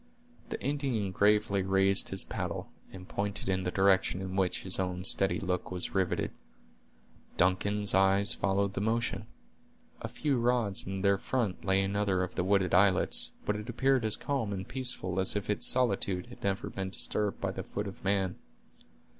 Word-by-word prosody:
The - - -4
Indian 130 -8 -1
gravely 105 +1 +2
raised 95 +1 +2
his 95 - 0
paddle, - - -5 0.2
and 95 -1 -11
pointed 100 -1 -3
in 95 -1 0
the 90 - -2
direction 95 -1 +2
in 95 0 -5
which 95 -2 0
his 95 0 +2
own 90 0 -3
steady 95 0 +4
look 90 -2 -2
was 90 -1 -2
riveted. 95 -2 0 1.1
Duncan's 100 +3 +1
eyes 95 +1 +4
followed 100 0 0
the 100 - -3
motion. 115 +2 -1 0.7
A - - -4
few 145 -4 -1
rods 120 -6 0
in 95 0 -4
their 100 -1 +3
front 115 -7 -2
lay 95 0 +2
another 100 -1 0
of 90 - -5
the - - -1
wooded 95 -1 +1
islets, 95 0 +3 0.2
but 105 - 0
it 105 +3 -7
appeared 130 +1 +1
as 110 -1 0
calm 135 -7 -2
and 95 -1 -5
peaceful 120 -8 +1
as 95 +2 +2
if 105 0 -2
its 105 - 0
solitude 100 -7 +2
had - - -14
never 100 +6 -2
been 95 -1 -4
disturbed 105 +1 0
by - - -2
the - - -5
foot 105 - -5
of 100 - -9
man. 95 -2 0
100 Hz, 175 wpm, -30 LUFS, 95-105 Hz, 1.1 s, steady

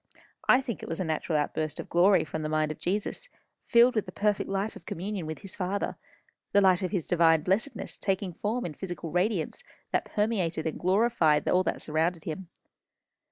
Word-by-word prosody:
I 255 - +7
think 235 -6 -5
it - - -7
was 165 - -3
a - - +1
natural 160 -1 -1
outburst 155 +1 -2
of - - -5
glory 185 +3 +4
from 160 0 -5
the 155 - -2
mind 155 0 +1
of 155 - -8
Jesus, 210 - -2 0.4
filled 240 +1 +6
with 215 - -1
the - - -6
perfect 210 -1 0
life 195 +2 -1
of - - -13
communion 190 -1 -4
with 155 - -6
his 195 -2 -8
Father 195 +1 -2 0.6
the 200 - +6
light 190 -2 +4
of 185 - -1
his 185 -6 -2
divine 165 -3 +4
blessedness 205 - -2
taking 190 -2 -1
form 225 +8 -2
in 165 - -4
physical 170 -2 -6
radiance 185 - 0 0.3
that - - +1
permeated 195 -7 -1
and 160 - -3
glorified 185 -5 +3
all 180 - +4
that - - -2
surrounded 160 +2 0
him. 170 +2 -6
185 Hz, 195 wpm, -28 LUFS, 160-205 Hz, 0.6 s, I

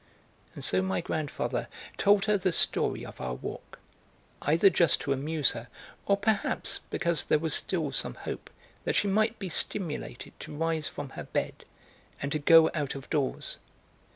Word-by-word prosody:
And - - -7
so 95 - +2
my 95 0 0
grandfather 155 -2 -2 0.3
told 200 0 +4
her 210 -1 +3
the 190 -2 +1
story - - +1
of - - -10
our 65 -1 -3
walk, 65 - -8 0.6
either 170 +6 +4
just 170 -4 +3
to 140 - 0
amuse 145 +1 +2
her, 115 +1 -7 0.4
or 200 - +4
perhaps 205 0 0
because 170 -2 0
there - - +3
was 160 0 -1
still 160 -6 +1
some 135 - +2
hope - - -6 0.3
that - - -1
she 205 - +2
might 215 +3 +2
be 195 - -5
stimulated 165 -8 -2
to - - -8
rise 160 -1 0
from 145 -2 -6
her - - -8
bed - - -3 0.5
and 140 - -3
to 155 - 0
go 160 +2 +7
out 145 -4 -2
of 135 -1 -9
doors. 145 -4 -1
160 Hz, 170 wpm, -29 LUFS, 140-190 Hz, 0.6 s, go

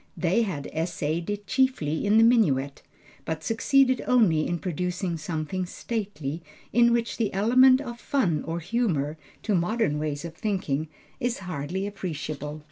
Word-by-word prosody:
They 180 +6 +2
had 175 -11 -2
essayed 165 0 -2
it 205 0 -3
chiefly 255 - +1
in 210 +2 +5
the 225 - +7
minuet, 145 - +3 0.4
but 160 0 -4
succeeded 255 - +3
only 190 -11 +4
in 175 - -1
producing 180 +1 -2
something 160 +3 -3
stately, 185 -9 -4 0.3
in 235 0 +5
which 235 -2 0
the 225 -3 0
element 255 +6 +6
of 240 -4 -7
fun 185 - 0
or 165 +1 -3
humor, 160 - -1 0.2
to 215 - 0
modern 180 -3 +1
ways 150 0 -3
of 165 - -6
thinking 165 -6 -2 0.3
is 245 0 -1
hardly 175 +3 -3
appreciable. 155 -6 -5
180 Hz, 145 wpm, -26 LUFS, 155-225 Hz, 0.4 s, the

